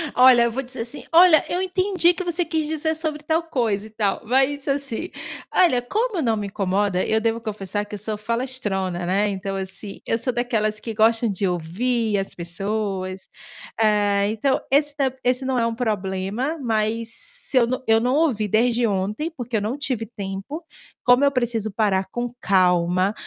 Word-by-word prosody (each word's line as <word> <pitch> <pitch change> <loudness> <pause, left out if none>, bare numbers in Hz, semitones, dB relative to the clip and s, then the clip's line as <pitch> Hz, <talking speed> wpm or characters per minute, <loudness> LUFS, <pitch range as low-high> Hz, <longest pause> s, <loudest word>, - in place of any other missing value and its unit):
Olha, 250 -1 +7
eu 235 - +1
vou 265 +4 -3
dizer 255 -2 -7
assim: 235 +5 -6
"Olha, 340 -2 +7
eu 360 - 0
entendi 370 -1 +2
que 370 - -4
você 345 0 -1
quis 315 -1 -1
dizer 315 0 -1
sobre 310 -2 -3
tal 320 +2 +1
coisa 225 -10 -1
e - - -15
tal", 210 -2 -1
mas 270 +4 +1
assim, 275 +4 -2 0.4
olha 275 -10 +4
como 430 - -1
eu 315 - 0
não 225 -2 +1
me 205 - -3
incomoda, 195 -1 0
eu 220 - +2
devo 230 +1 0
confessar 205 -2 -4
que 210 - -8
eu - - -5
sou 210 +1 -4
falastrona, 210 -7 -2
né, 195 +4 +1
então 195 0 -4
assim, 195 +1 -6
eu 225 - 0
sou 250 +2 -1
daquelas 220 -3 0
que 225 0 -6
gostam 225 +1 +3
de 195 +1 -1
ouvir 210 +6 -1
as 195 - -3
pessoas. 190 +2 -3 0.5
Eh, 205 -1 +3
então 245 +5 0
esse 290 +1 +2
tamb 265 -2 0
esse 250 +1 +1
não 260 -1 0
é 230 - +2
um 230 - -3
problema, 215 - -2
mas 225 -1 0
se - - +1
eu 235 - +5
não 255 +1 -3
eu 225 0 +5
não 250 +3 +1
ouvi 260 -10 +2
desde 235 +3 +2
ontem, 210 - -2
porque 245 -6 -3
eu - - -1
não 225 +7 -2
tive 255 -6 -2
tempo, 205 - -6 0.4
como 250 +3 +5
eu 280 - +4
preciso 230 -4 -1
parar 195 -3 +1
com 240 0 -2
calma, 185 +1 +2
230 Hz, 190 wpm, -23 LUFS, 205-270 Hz, 0.5 s, Olha